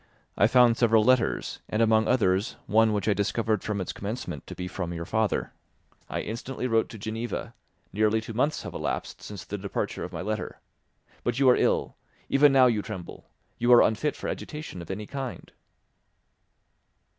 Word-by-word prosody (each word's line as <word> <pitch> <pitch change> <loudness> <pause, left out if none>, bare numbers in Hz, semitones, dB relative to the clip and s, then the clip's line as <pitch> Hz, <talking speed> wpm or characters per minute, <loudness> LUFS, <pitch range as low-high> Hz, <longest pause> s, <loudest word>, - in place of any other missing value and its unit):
I - - +4
found 120 -1 +5
several 115 -2 +4
letters, 125 0 +1
and, 105 - -1
among 110 -1 +4
others, 105 -3 +2
one 110 +1 +4
which 105 -1 -1
I 105 - +4
discovered 105 +1 0
from 105 -1 -2
its 90 - -3
commencement 105 +5 -5
to - - -7
be 90 - -5
from 90 -1 -4
your 85 0 -5
father. 110 +2 0 0.6
I - - -2
instantly 125 +4 -5
wrote 115 -2 +2
to 115 - -9
Geneva; 110 +3 -4 0.4
nearly 110 +2 +2
two 110 +1 -7
months 135 +7 0
have - - -7
elapsed - - -4
since 100 -3 -8
the 105 - -5
departure 100 0 -3
of 90 - -6
my 85 0 -5
letter. 105 +2 -4 0.6
But 120 0 -1
you 135 -1 +4
are - - +5
ill; - - +1 0.3
even 145 +1 +5
now 135 -1 +6
you 115 -4 +2
tremble; 100 -5 -8 0.3
you 120 +1 +3
are 120 - +8
unfit 125 +7 0
for - - -6
agitation 150 - -6
of 85 - -11
any 105 +2 -4
kind." 135 +1 -6
110 Hz, 180 wpm, -27 LUFS, 105-120 Hz, 0.6 s, are